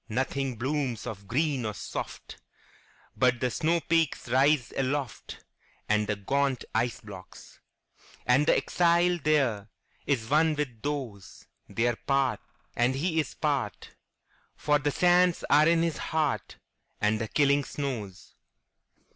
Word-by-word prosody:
Nothing 130 +2 -2
blooms 130 -1 -2
of 100 -4 -7
green 140 +1 0
or 105 -2 -3
soft, - - -7 0.7
But 125 -2 +2
the 125 0 0
snowpeaks 165 -3 0
rise 135 -1 +3
aloftAnd 130 -5 -3
the 105 - 0
gaunt 135 +5 -1
ice 115 +2 -1
blocks. 100 -5 -12 0.7
And 135 +5 +3
the - - +5
exile 175 0 +2
thereIs 135 -9 +1 0.6
one 155 +3 +3
with 130 -7 -4
those; 130 -10 -5 0.2
They 115 +1 0
are 120 -2 0
part, 135 -2 +1 0.4
and 120 +2 +2
he 160 +3 0
is 150 - -3
part, - - -2 0.6
For 150 0 +1
the 145 0 0
sands 180 +3 +3
are 150 +2 +6
in 165 0 +3
his 165 -3 -1
heart, 150 - -2 0.4
And 105 +1 +1
the 110 - -2
killing 140 +3 +2
snows. 115 -11 -6
135 Hz, 125 wpm, -28 LUFS, 115-150 Hz, 0.7 s, are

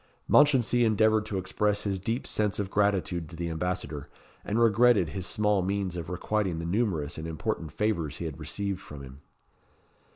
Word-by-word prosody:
Mounchensey 125 -4 +4
endeavoured 110 -1 +3
to 100 - -3
express 105 +2 0
his 100 -2 -1
deep 115 +7 -2
sense 105 -2 0
of 100 -2 -3
gratitude 95 -5 0
to 85 - -10
the 85 0 -3
ambassador, 80 -4 -3 0.3
and 105 +3 -1
regretted 115 -5 +4
his 95 +2 -4
small 105 +1 +2
means 95 -1 -2
of 85 -2 -5
requiting 95 0 -1
the 85 - -4
numerous 85 -7 -1
and 80 - -5
important 80 +1 -3
favours 100 -8 -1
he 85 - -5
had 80 -4 -6
received 100 -2 -3
from 70 -2 -10
him. 65 +1 -12
95 Hz, 170 wpm, -28 LUFS, 85-105 Hz, 0.3 s, Mounchensey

